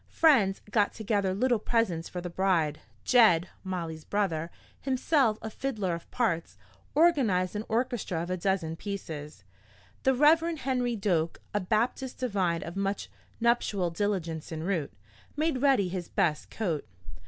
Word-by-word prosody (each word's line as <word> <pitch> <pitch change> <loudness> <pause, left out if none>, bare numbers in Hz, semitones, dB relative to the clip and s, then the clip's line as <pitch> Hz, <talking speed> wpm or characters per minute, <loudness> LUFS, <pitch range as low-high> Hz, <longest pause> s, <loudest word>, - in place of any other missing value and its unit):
Friends 225 -12 +4
got 205 -2 +2
together 205 -3 0
little 240 +4 +2
presents 205 -8 0
for 180 - -5
the 175 - -5
bride. 170 -5 +1 0.2
Jed, 185 -8 +5
Molly's 165 -4 -4
brother, 170 -5 -1 0.3
himself 260 -3 +2
a 220 - -4
fiddler 215 -9 -2
of 170 0 -7
parts, 195 -10 -1 0.4
organized 245 - +3
an 210 - -2
orchestra 225 -8 -1
of 175 - -5
a 185 - 0
dozen 180 -3 -1
pieces. 155 - -6 0.6
The 265 0 +3
Rev. 320 +4 +4
Henry 250 -4 0
Doak, 175 -6 0
a 205 - +2
Baptist 230 +6 -1
divine 190 -9 0
of 170 - -7
much 195 0 -2 0.3
nuptial 225 -6 +1
diligence 170 -4 -2
en 160 -1 -4
route, 170 -6 -1 0.5
made 305 -4 0
ready 270 -9 +4
his 180 -1 -5
best 150 -2 0
coat. 170 -9 -2
200 Hz, 140 wpm, -29 LUFS, 170-240 Hz, 0.6 s, Jed